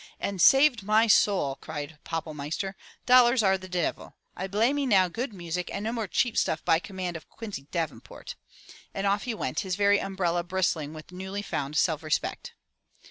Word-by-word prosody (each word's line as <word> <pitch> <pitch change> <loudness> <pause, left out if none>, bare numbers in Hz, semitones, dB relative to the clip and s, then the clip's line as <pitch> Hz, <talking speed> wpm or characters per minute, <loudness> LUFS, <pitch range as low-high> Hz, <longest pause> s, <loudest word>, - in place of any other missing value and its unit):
"And 195 -3 -2
saved 270 - +6
my 215 +3 +3
soul!" 195 -10 +3
cried 150 -1 -7
Pappelmeister. 160 +3 -4 0.3
"Dollars 250 -1 +6
are 190 -1 +4
de 185 0 -8
devil. 180 -2 -3 0.2
I 190 - -4
blay 220 +7 +2
me 285 -1 -1
now 190 -6 +5
good 240 +7 -4
music 180 -2 -4
and 200 - -4
no 225 - -1
more 225 -3 -2
cheap 230 +6 0
stuff 160 - -1
by 160 - +4
command 185 -2 -5
of 165 - -9
Quincy 205 -12 -8
Davenport!" 165 -4 -5 0.6
And 195 - -2
off 200 +1 +1
he 240 -3 -2
went, - - -2
his 190 -3 -2
very 205 0 +4
umbrella 175 -3 -1
bristling 175 -4 -1
with 155 +3 -11
newly 190 +3 -5
found 145 -6 -3
self 160 -2 +2
respect. 155 -1 -2
190 Hz, 180 wpm, -27 LUFS, 165-210 Hz, 0.6 s, saved